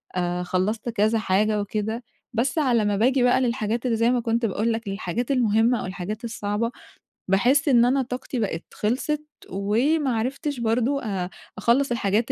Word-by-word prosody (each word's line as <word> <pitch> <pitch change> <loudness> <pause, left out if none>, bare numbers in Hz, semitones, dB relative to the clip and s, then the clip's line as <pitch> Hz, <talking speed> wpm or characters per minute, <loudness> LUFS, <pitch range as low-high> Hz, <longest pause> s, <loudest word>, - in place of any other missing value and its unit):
أ 180 0 -1
خلّصت 190 +6 -1
كذا 220 0 +2
حاجة 210 +1 +1
وكده. 215 +3 -3 0.3
بس 250 +6 0
على 245 -8 +3
ما 205 -1 +1
باجي 255 +4 +3
بقى 250 +1 +4
للحاجات 235 -1 -1
اللي 230 -2 +1
زي 230 +2 +3
ما 250 - +2
كنت 230 0 0
باقول 220 +2 0
لك، 225 -2 -5
للحاجات 195 +5 -2
المهمة 230 -1 +3
أو - - -4
الحاجات 195 +5 -5
الصعبة، 225 0 -2 0.6
باحس 245 +10 +3
إن 240 -4 +5
أنا 270 +2 +2
طاقتي 250 0 -4
بقت 190 -6 -2
خلصت 285 +7 -1 0.2
وما 240 - +1
عرفتش 270 +4 -2
برضه 240 +4 +1
أ 190 -5 -2 0.3
أخلّص 255 +3 +2
الحاجات 220 -1 +1
230 Hz, 165 wpm, -24 LUFS, 205-250 Hz, 0.6 s, إن